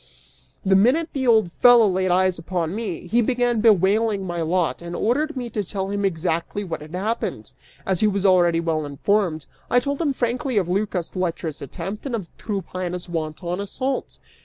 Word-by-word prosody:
The 190 0 +4
minute 260 - +3
the 260 -2 -1
old 220 -7 +4
fellow 240 -3 +7
laid 185 -1 0
eyes 185 0 +2
upon 170 -1 -2
me, 205 -6 -4
he 230 +7 +2
began 245 -1 +1
bewailing 210 0 +3
my 175 -2 -3
lot 165 -4 0
and 170 0 -6
ordered 290 +6 0
me 245 -1 -3
to 210 -1 -2
tell 195 +1 -4
him 200 0 -1
exactly 170 +2 -1
what 165 -5 -5
had 155 +3 -8
happened. 220 +5 -3 0.3
As 190 -3 0
he 215 - +4
was 200 -1 0
already 175 -3 +4
well 160 -2 -1
informed, 160 +2 0 0.2
I 245 - +5
told 280 +4 -3
him 305 -4 +1
frankly 250 -1 -1
of 185 -4 +2
Lycas' 185 -2 -2
lecherous 170 -4 -3
attempt 190 - -6
and 250 - -2
of 195 -7 -7
Tryphaena's 185 -3 -4
wanton 170 +2 -3
assault. 260 +7 -3
190 Hz, 180 wpm, -23 LUFS, 175-225 Hz, 0.3 s, fellow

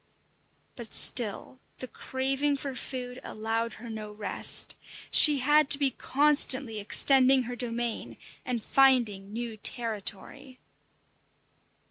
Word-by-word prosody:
But 235 -3 -7
still 240 +2 +2 0.2
the 255 - -8
craving 270 +3 -3
for 275 0 -7
food 250 0 -7
allowed 225 +2 -5
her 235 - -13
no 215 -2 -9
rest. 210 0 +1 0.4
She 300 -2 +8
had 295 +2 +1
to 280 - +7
be 280 -2 0
constantly 275 -4 0
extending 265 +5 +3
her 245 +1 -8
domain 235 -1 -6 0.3
and 240 -3 -5
finding 235 -8 0
new 230 0 -7
territory. 230 +4 -4
250 Hz, 110 wpm, -26 LUFS, 225-270 Hz, 0.4 s, She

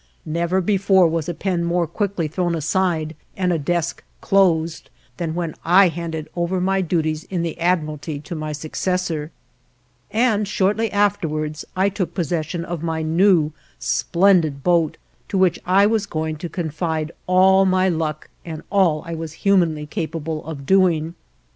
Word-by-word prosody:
Never 170 +4 0
before 190 -1 +4
was 165 0 -2
a - - -1
pen 180 -2 -1
more 170 0 +1
quickly 180 0 -2
thrown 175 +2 -1
aside 165 -1 0 0.2
and 180 -2 +1
a 165 - 0
desk 170 +2 -2 0.2
closed 170 -4 +2 0.3
than 165 -2 -3
when 170 -2 -2
I 180 +3 +6
handed 165 -1 -5
over 175 +2 0
my 190 +1 +1
duties 160 -3 -1
in 180 -3 -2
the 165 - -4
Admiralty 155 -3 -1
to 160 +4 -8
my 155 -1 -4
successor, 160 +1 -2 0.8
and 220 -3 +1
shortly 205 +3 +1
afterwards 155 -7 0
I 190 +2 +3
took 185 -4 -4
possession 170 0 -2
of 175 -2 -5
my 160 -1 -2
new, 165 -1 +3 0.3
splendid 170 -6 +2
boat, 170 -3 +2 0.3
to 195 - -1
which 185 -1 +3
I 195 +2 +5
was 215 -1 +1
going 155 -1 -3
to 170 +2 -6
confide 160 -2 -3 0.2
all 190 +1 +5
my 185 0 +3
luck 160 -3 -2 0.2
and 160 -2 -7
all 180 -7 +3
I 170 - -5
was 160 -1 -5
humanly 170 -6 +3
capable 160 -2 -4
of 145 -4 -6
doing. 170 -3 +3
170 Hz, 155 wpm, -21 LUFS, 160-185 Hz, 0.8 s, I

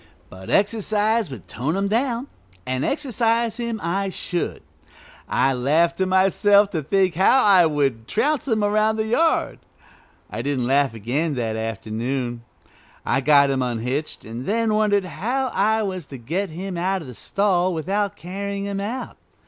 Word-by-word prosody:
But 95 0 -10
exercise 215 0 +1
would 120 -10 -10
tone 140 - -2
him 195 +1 0
down, 235 +3 0 0.4
and 130 +1 -2
exercise 235 -5 0
him 235 -2 -3
I 195 +4 -1
should. 175 -2 -3 0.7
I 135 - +2
laughed 155 +7 +1
to 190 - +2
myself 195 +2 +4
to 160 - -1
think 185 +4 +1
how 195 +10 +4
I 190 -5 +6
would 135 -7 -1
trounce 300 -1 0
him 220 -4 +1
around 215 +1 +2
the 220 0 -1
yard. 320 +9 +1 0.7
I - - -5
didn't 135 -3 -1
laugh 135 -1 +2
again 140 +8 -1
that 115 -3 -2
afternoon. 115 +3 -3 0.6
I 135 - +1
got 140 0 +5
him 135 -1 0
unhitched, 125 +5 -3
and 115 +4 -7
then 225 +1 +1
wondered 205 -2 +2
how 255 +9 -2
I 220 +1 +1
was 185 -6 -4
to 135 - -8
get 170 +12 -3
him 180 +3 -5
out 190 0 -1
of - - -11
the 125 - -8
stall 185 - +1
without 195 +5 -1
carrying 200 +2 -5
him 200 -1 -3
out. 230 +6 -5
185 Hz, 160 wpm, -22 LUFS, 135-210 Hz, 0.7 s, I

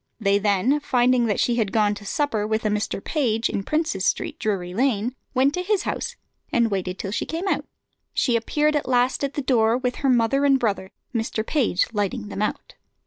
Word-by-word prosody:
They 200 -2 +3
then, 210 +8 +2
finding 250 -3 +2
that 205 - 0
she 240 -1 +2
had 215 -4 0
gone 210 -2 +2
to 205 0 -9
supper 225 -8 0
with 220 0 -1
a - - +3
Mr. 210 -1 -2
Page, 235 -6 0
in - - -2
Princes 310 +9 -1
Street, - - -1
Drury 190 -6 -2
Lane, 240 0 +1 0.2
went 270 +3 +3
to 360 - -1
his 400 +1 0
house - - -3 0.4
and 235 -2 +2
waited 185 -1 -2
till 195 - -4
she 210 - -1
came 335 +4 -3
out. - - 0 0.5
She 245 - +1
appeared 300 +6 +1
at 290 -3 -1
last 250 +2 +2
at 280 0 -2
the 290 - -2
door, 235 -3 +3
with 250 -1 -2
her 275 - 0
mother 250 +3 +3
and 275 -1 +5
brother, 200 -6 -1 0.2
Mr. 225 -1 -2
Page 240 - +1
lighting 210 +1 -2
them 205 - -4
out. 210 - -3
235 Hz, 205 wpm, -23 LUFS, 210-270 Hz, 0.5 s, and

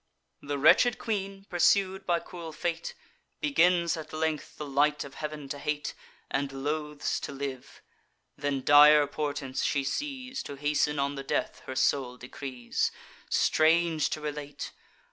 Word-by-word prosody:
The 145 0 -3
wretched 190 - +5
queen, 195 -3 -3
pursued 190 +2 +2
by 170 -1 +2
cruel 170 -1 -8
fate, 170 0 -3 0.4
Begins 180 - +3
at 160 -2 -8
length 155 -1 -2
the 150 - -5
light 145 +2 +2
of 140 - -10
heav'n 150 -1 -6
to 145 - -4
hate, 150 +1 -2 0.4
And 135 0 -1
loathes 150 +2 -2
to - - -5
live. 135 -2 -6 0.5
Then 140 -2 -2
dire 145 +1 +8
portents 145 -2 -3
she 140 -2 +1
sees, 260 - -3
To 140 - -7
hasten 150 +1 +1
on 140 0 0
the 135 -1 -6
death - - -2
her 130 - -5
soul 130 -2 +1
decrees: 125 -1 -3 0.4
Strange 160 0 +3
to 155 - -4
relate! 145 -1 -5
150 Hz, 145 wpm, -29 LUFS, 140-170 Hz, 0.5 s, dire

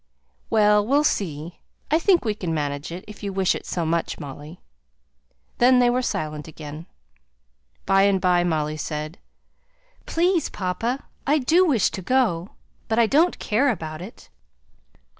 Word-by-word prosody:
"Well! 210 -1 +4
we'll 280 +7 +2
see 160 - -1
yes! 170 +2 -9 0.4
I 315 - +4
think 350 -4 +3
we 215 - +1
can 175 -6 -3
manage 145 0 -3
it, 175 +2 -7
if 210 - -11
you 200 -2 -3
wish 190 -1 +1
it - - -7
so 170 -2 -2
much, 165 +1 -1
Molly." 145 +3 -9 1.0
Then 250 +1 +6
they 245 -1 +4
were 250 +1 +1
silent 155 -9 -3
again. 155 +1 -9 1.0
By 195 0 +4
and 195 -1 +2
by, 180 -1 +3
Molly 155 -3 -1
said, 155 +2 -5 0.9
"Please, 345 0 +1
papa 225 +8 -3 0.2
I 295 +2 +4
do 335 +7 +3
wish 245 - +2
to 190 - -5
go, 200 -6 +1 0.4
but 225 - -1
I 235 - +5
don't 310 +10 +3
care 255 +7 +1
about 160 -8 -4
it." 195 +6 -12
195 Hz, 160 wpm, -23 LUFS, 160-250 Hz, 1.0 s, Then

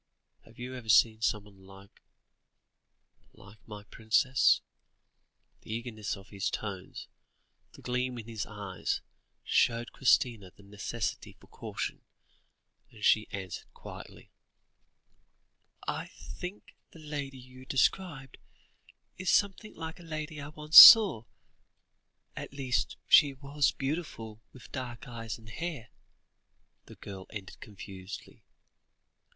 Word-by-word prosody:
Have 115 - -19
you 125 +1 -7
ever 120 -3 -9
seen 110 0 +5
someone 105 -3 -3
like 95 +1 -16 1.3
like 100 +2 -17
my 105 -2 -9
princess?" 115 +5 +2 1.0
The - - -11
eagerness 110 -2 -4
of 95 +2 -15
his 100 -2 -2
tones, 95 -3 -6 0.7
the - - -15
gleam 125 0 -2
in 115 - -8
his 110 -2 -5
eyes, 100 -4 -4 0.4
showed 120 0 +1
Christina 120 -6 +2
the 100 - -18
necessity 105 +3 -5
for - - -19
caution, - - -6 0.9
and 110 -3 -7
she 110 0 +4
answered 95 -3 -7
quietly - - -12 1.6
"I - - -3
think 180 +3 -10 0.2
the - - -16
lady 145 -3 -6
you 130 +1 -14
describe, 135 -1 0 0.8
is 185 - -2
something 205 +2 +1
like 160 +1 -7
a - - -13
lady 155 -2 -6
I 140 - -7
once 150 +1 +7
saw; 200 - +10 1.1
at - - -8
least, 130 -3 -2
she 145 -3 +6
was 140 +1 0
beautiful, 135 -7 -5
with 130 - -15
dark 120 -3 -7
eyes 115 -2 -6
and 110 -1 -17
hair," 140 -1 -6 1.0
the - - -12
girl 95 -2 -10
ended 100 -3 -9
confusedly. 95 -1 -10
120 Hz, 115 wpm, -30 LUFS, 105-140 Hz, 1.6 s, saw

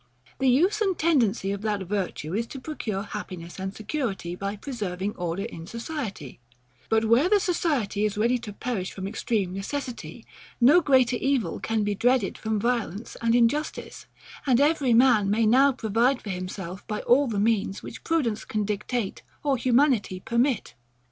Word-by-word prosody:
The 265 -1 +3
use 365 - +3
and 385 -5 +1
tendency 240 -11 +2
of 200 0 -4
that 210 -2 -1
virtue 185 -4 -3
is 230 +3 -1
to 270 - -8
procure 225 -9 -4
happiness 175 -4 -7
and 190 0 -3
security, 215 - -3
by 200 +2 -4
preserving 205 -5 -4
order 175 +2 -3
in 170 -7 -7
society: 230 - -6 0.5
but 220 0 +3
where 240 +10 +4
the 415 0 +5
society 310 - 0
is 210 -1 0
ready 235 +4 +2
to 225 -3 -7
perish 205 -3 -3
from 190 0 -5
extreme 200 -2 -1
necessity, 245 +6 -5 0.3
no 285 +9 +6
greater 260 -5 +3
evil 270 -3 0
can 225 -1 -1
be 205 0 0
dreaded 245 0 +2
from 220 -1 -2
violence 230 -2 -2
and 230 0 +2
injustice; 245 +6 0 0.4
and 255 -2 +4
every 285 -4 +3
man 235 -5 +5
may 220 +2 +2
now 265 +6 +5
provide 240 +2 +1
for 205 - -6
himself 185 0 -6
by 210 -1 -3
all 270 +4 +4
the 215 -4 -1
means, 205 -2 0
which - - -9
prudence 275 -10 0
can 215 -1 -2
dictate, 210 +1 -3 0.2
or 285 -2 +2
humanity 245 -6 +2
permit. 235 +5 0
230 Hz, 165 wpm, -26 LUFS, 200-260 Hz, 0.5 s, no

